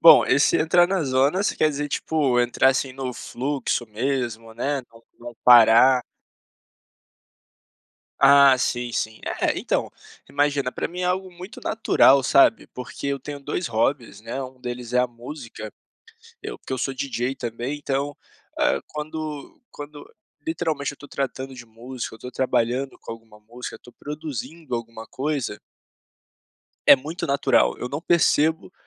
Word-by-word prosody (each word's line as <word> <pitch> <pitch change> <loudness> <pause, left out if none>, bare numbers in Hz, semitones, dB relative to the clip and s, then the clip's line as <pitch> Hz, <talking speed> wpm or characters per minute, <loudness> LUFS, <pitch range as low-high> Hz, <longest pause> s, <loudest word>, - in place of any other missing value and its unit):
Bom, - - +9
esse - - +4
entrar 175 +2 +4
na 185 -2 0
zona 140 +7 +2
você - - -1
quer 155 - +3
dizer, 145 +1 -3
tipo, 140 -4 0
entrar 120 +2 +3
assim 135 0 -2
no 130 -1 -4
fluxo 130 -1 -3
mesmo 115 -1 -3
né, 140 +3 -2
não 115 0 -18 0.2
não 120 0 -9
parar? 120 +2 +7 2.2
Ah, 140 -1 +7
sim, 120 -1 -1
sim, 110 -1 -3 0.2
é - - +1
então - - -1 0.4
imagina, 140 -2 0
para - - -3
mim 180 +1 -7
é - - 0
algo 185 +1 -1
muito 180 +3 -11
natural 140 -10 +4
sabe, 140 - +4
porque 125 +2 -7
eu 140 -1 -2
tenho 145 +2 -7
2 145 +5 -3
hobbies, 115 -2 -1
né, 120 +5 -5
um 130 0 -10
deles 120 -1 -6
é 125 - +3
a 125 - +3
música, 120 -3 -9 0.7
eu - - -6
porque - - -8
eu 130 - -2
sou 135 +2 -2
DJ 130 -1 -2
também 120 +3 -4
então, 145 0 -3 0.4
ah, 70 - +2
quando 155 - -6
quando 145 0 -10 0.4
literalmente 160 -3 -2
eu - - -11
estou 145 0 -14
tratando 135 -1 -4
de 125 -2 -11
música, 120 +2 -7
eu - - -10
estou 125 +3 -9
trabalhando 130 +1 0
com - - -8
alguma 115 -2 -14
música, 120 +4 -9
estou 120 - -17
produzindo 150 0 -6
alguma 115 -1 -6
coisa 135 -6 -3 1.3
é - - +10
muito 155 +6 -5
natural, 140 0 +2
eu 125 - -4
não 145 +3 -4
percebo 160 0 +2
135 Hz, 155 wpm, -23 LUFS, 120-145 Hz, 2.2 s, é